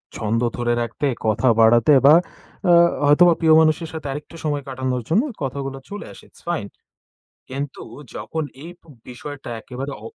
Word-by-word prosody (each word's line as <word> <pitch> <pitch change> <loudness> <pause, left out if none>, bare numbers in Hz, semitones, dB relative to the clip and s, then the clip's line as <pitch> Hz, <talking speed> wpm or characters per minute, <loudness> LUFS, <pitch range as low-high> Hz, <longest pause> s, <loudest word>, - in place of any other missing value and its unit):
ছন্দ 110 +2 -1 0.2
ধরে 120 0 0
রাখতে 120 +5 -2 0.2
কথা 110 +4 +1
বাড়াতে 120 +5 +5
বা 150 +3 +9 0.5
অ্যা 175 -1 +6 0.3
হয়তোবা 170 +4 +6
প্রিয় 160 -2 +4
মানুষের 160 +1 +1
সাথে 155 -3 -6
আরেকটু 150 +4 -8
সময় 145 -2 -1
কাটানোর 130 -2 -3
জন্য 210 - +3 0.2
কথাগুলো 135 0 -4
চলে 205 +1 -7
আসে। - - -15
It's - - -21
fine. 110 -13 -2 0.8
কিন্তু 140 +1 -5 0.3
যখন 160 -1 -4 0.2
এই 170 - -8 0.4
বিষয়টা 135 +1 -8
একেবারে 135 +4 -7
অ - - -6
140 Hz, 155 wpm, -21 LUFS, 125-155 Hz, 0.8 s, বা